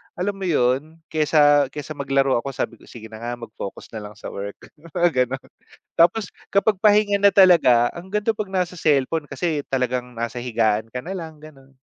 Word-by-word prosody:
alam 190 Hz, +3 st, -1 dB
mo 190 Hz, -, -3 dB
‘yon, 145 Hz, +1 st, +1 dB, 0.2 s
kaysa 145 Hz, -2 st, +4 dB
kaysa 150 Hz, +2 st, -8 dB
maglaro 135 Hz, -3 st, +1 dB
ako 135 Hz, +1 st, -6 dB
sabi 115 Hz, -, -4 dB
ko, -, -, -19 dB
“Sige 110 Hz, -2 st, -11 dB
na 110 Hz, -, -9 dB
nga, 120 Hz, +1 st, -4 dB
mag-focus 110 Hz, -4 st, -9 dB
na 110 Hz, -2 st, -7 dB
lang 105 Hz, -, -14 dB
sa -, -, -8 dB
work.” 100 Hz, +1 st, -6 dB, 0.4 s
Mga 175 Hz, -1 st, +3 dB, 0.2 s
gano’n. 135 Hz, +2 st, -6 dB, 0.5 s
Tapos 180 Hz, +4 st, +3 dB, 0.2 s
kapag 200 Hz, 0 st, +3 dB
pahinga 205 Hz, 0 st, +4 dB
na 200 Hz, 0 st, +4 dB
talaga, 145 Hz, -11 st, +6 dB
ang 185 Hz, +4 st, -11 dB
ganda 210 Hz, +1 st, 0 dB
‘pag 215 Hz, -, -2 dB
nasa 180 Hz, -1 st, -1 dB
cellphone 150 Hz, 0 st, +1 dB
kasi 145 Hz, +1 st, -3 dB
talagang 125 Hz, -1 st, -1 dB
nasa 115 Hz, +1 st, -4 dB
higaan 115 Hz, -3 st, 0 dB
ka 125 Hz, -, -3 dB
nalang 165 Hz, -2 st, -7 dB
gano’n. 135 Hz, -3 st, -16 dB
140 Hz, 180 wpm, -22 LUFS, 120-175 Hz, 0.5 s, talaga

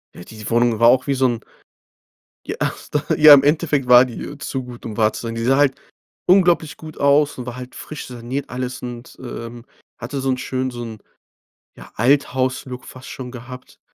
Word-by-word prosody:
Ja, -, -, -10 dB
die 110 Hz, +2 st, -10 dB
Wohnung 120 Hz, -1 st, +2 dB
war 115 Hz, 0 st, +7 dB
auch 130 Hz, +2 st, +3 dB
wie 140 Hz, -, +1 dB
so 130 Hz, 0 st, +2 dB
'n 120 Hz, -2 st, -3 dB, 1.0 s
Ja, -, -, -4 dB, 0.6 s
ja, 155 Hz, -1 st, +9 dB
im 140 Hz, -, +8 dB
Endeffekt 145 Hz, -3 st, +1 dB
war 125 Hz, 0 st, +8 dB
die, 125 Hz, -3 st, -6 dB
äh, 145 Hz, -, -8 dB
zu 130 Hz, -1 st, -4 dB
gut, 125 Hz, -1 st, -11 dB
um 110 Hz, -2 st, -6 dB
wahr 110 Hz, -1 st, +3 dB
zu -, -, -6 dB
sein. 115 Hz, -1 st, -5 dB
Die 115 Hz, -, -3 dB
sah 130 Hz, +3 st, +3 dB
halt 145 Hz, -2 st, +2 dB, 0.5 s
unglaublich 175 Hz, -5 st, +3 dB
gut 155 Hz, -1 st, -11 dB
aus 140 Hz, +1 st, +3 dB
und 125 Hz, -, -6 dB
war 125 Hz, -1 st, -6 dB
halt 125 Hz, 0 st, -9 dB
frisch 155 Hz, -, -8 dB
saniert, 125 Hz, +3 st, -5 dB
alles 125 Hz, +1 st, -5 dB
und, 120 Hz, 0 st, -8 dB
ähm, 120 Hz, -1 st, -8 dB, 0.3 s
hatte 140 Hz, -, -5 dB
so 135 Hz, 0 st, -1 dB
'n 130 Hz, -, +1 dB
schönen 130 Hz, 0 st, -2 dB
so 120 Hz, -1 st, -7 dB
'n, 110 Hz, -2 st, -8 dB, 0.8 s
ja, -, -, -14 dB
Althaus-Look 130 Hz, 0 st, 0 dB
fast 130 Hz, 0 st, -11 dB
schon 125 Hz, -2 st, -7 dB
gehabt. 125 Hz, +1 st, -11 dB
125 Hz, 200 wpm, -20 LUFS, 120-140 Hz, 1.0 s, ja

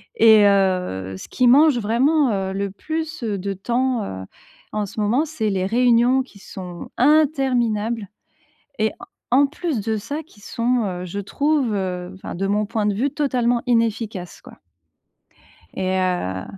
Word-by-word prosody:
et 220 Hz, -2 st, +7 dB
heu, 180 Hz, -, +1 dB
ce -, -, -10 dB
qui 250 Hz, -, +1 dB
mange, 285 Hz, +2 st, +6 dB
vraiment, 255 Hz, +5 st, +2 dB
heu, 195 Hz, -1 st, -2 dB
le 200 Hz, 0 st, -2 dB
plus, 315 Hz, +9 st, -5 dB
heu, 210 Hz, -3 st, -1 dB
de 195 Hz, +1 st, -3 dB
temps, 240 Hz, +4 st, -1 dB
heu, 95 Hz, -, -6 dB, 0.5 s
en 210 Hz, -1 st, -1 dB
ce 205 Hz, -, -8 dB
moment, 230 Hz, +9 st, +2 dB
c'est 270 Hz, -9 st, -2 dB
les 190 Hz, -1 st, -1 dB
réunions 245 Hz, +3 st, +3 dB
qui 220 Hz, -6 st, -18 dB
sont 180 Hz, -3 st, -9 dB
interminables 250 Hz, -7 st, +2 dB, 0.7 s
et 220 Hz, 0 st, +2 dB, 0.4 s
en 270 Hz, +3 st, +5 dB
plus 295 Hz, -4 st, -3 dB
de 220 Hz, +1 st, -1 dB
ça, 285 Hz, +10 st, -5 dB
qui 235 Hz, -9 st, -21 dB
sont, 235 Hz, +3 st, 0 dB
heu, 180 Hz, -1 st, -4 dB
je 190 Hz, +3 st, -5 dB
trouve, 280 Hz, +3 st, 0 dB
heu, 180 Hz, -2 st, -3 dB
enfin, 190 Hz, -, -8 dB
de 195 Hz, +3 st, -2 dB
mon 210 Hz, +1 st, +1 dB
point 215 Hz, -1 st, -1 dB
de 205 Hz, -, 0 dB
vue, 265 Hz, +7 st, 0 dB
totalement 250 Hz, -5 st, 0 dB
inefficaces, 225 Hz, -6 st, -1 dB
quoi -, -, -15 dB, 1.2 s
et 190 Hz, 0 st, 0 dB
heu, 175 Hz, -, -1 dB
220 Hz, 160 wpm, -21 LUFS, 195-255 Hz, 1.2 s, et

